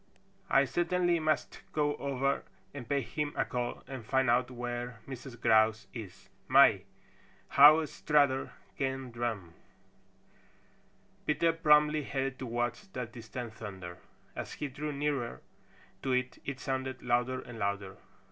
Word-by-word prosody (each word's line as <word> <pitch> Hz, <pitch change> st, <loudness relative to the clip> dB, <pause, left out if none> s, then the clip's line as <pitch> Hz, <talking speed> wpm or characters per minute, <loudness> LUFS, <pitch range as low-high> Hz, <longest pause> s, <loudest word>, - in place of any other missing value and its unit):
I 135 Hz, +1 st, +5 dB
certainly 175 Hz, +2 st, +1 dB
must 155 Hz, 0 st, -1 dB
go 145 Hz, -1 st, +1 dB
over 140 Hz, 0 st, 0 dB, 0.3 s
and 130 Hz, -5 st, -8 dB
pay 140 Hz, -1 st, +2 dB
him 145 Hz, +5 st, -3 dB
a -, -, +1 dB
call 120 Hz, -1 st, -3 dB
and 130 Hz, -3 st, -7 dB
find 130 Hz, +1 st, +2 dB
out 125 Hz, +1 st, +2 dB
where 120 Hz, -1 st, -5 dB
Mrs. 130 Hz, -2 st, -8 dB
Grouse 110 Hz, -2 st, +4 dB
is. 100 Hz, -4 st, -9 dB, 0.2 s
My, 120 Hz, -8 st, +6 dB, 0.6 s
how 155 Hz, +3 st, +8 dB
Strutter 145 Hz, -3 st, +1 dB, 0.3 s
can 135 Hz, -2 st, -2 dB
drum!" 115 Hz, -8 st, -3 dB, 1.7 s
Peter 165 Hz, +2 st, +3 dB
promptly 150 Hz, -1 st, +4 dB
headed 135 Hz, -2 st, -3 dB
towards 120 Hz, -, -2 dB
that 125 Hz, -2 st, -4 dB
distant 115 Hz, 0 st, -7 dB
thunder. 95 Hz, -5 st, -8 dB, 0.4 s
As -, -, -5 dB
he 145 Hz, -, -4 dB
drew 150 Hz, +3 st, -4 dB
nearer 140 Hz, -4 st, -2 dB, 0.6 s
to 130 Hz, -, 0 dB
it, 125 Hz, 0 st, -1 dB
it 140 Hz, -2 st, -4 dB
sounded 130 Hz, -1 st, -3 dB
louder 125 Hz, +1 st, +1 dB
and 120 Hz, -3 st, -9 dB
louder. 100 Hz, -1 st, -2 dB
130 Hz, 130 wpm, -31 LUFS, 120-145 Hz, 1.7 s, how